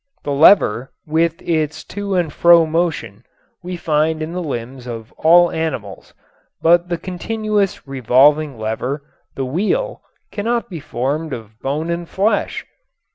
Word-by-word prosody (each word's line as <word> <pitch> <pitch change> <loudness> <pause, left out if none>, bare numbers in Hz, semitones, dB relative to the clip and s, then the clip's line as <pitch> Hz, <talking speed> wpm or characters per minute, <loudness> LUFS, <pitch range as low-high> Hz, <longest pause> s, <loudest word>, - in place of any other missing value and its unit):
The 145 - -3
lever, 140 - +4
with 165 +1 0
its 155 -1 -1
to 200 -1 -4
and 170 -5 0
fro 170 -1 +6
motion, 155 - -2 0.4
we 180 0 -5
find 155 0 0
in 155 - -5
the 180 - -3
limbs 130 -4 -5
of 115 -2 -7
all 175 +2 +5
animals, 125 -12 -5 0.4
but 175 +1 +3
the 170 - -1
continuous 205 +3 -1
and - - -24
revolving 135 +2 +3
lever, 120 +6 -3 0.3
the 135 - -2
wheel, 215 - -1 0.3
cannot 230 +1 -2
be 170 - -5
formed 145 +3 -3
of 110 -2 -9
bone 150 +5 -2
and 170 0 -4
flesh. 205 +4 0
160 Hz, 140 wpm, -19 LUFS, 135-175 Hz, 0.4 s, fro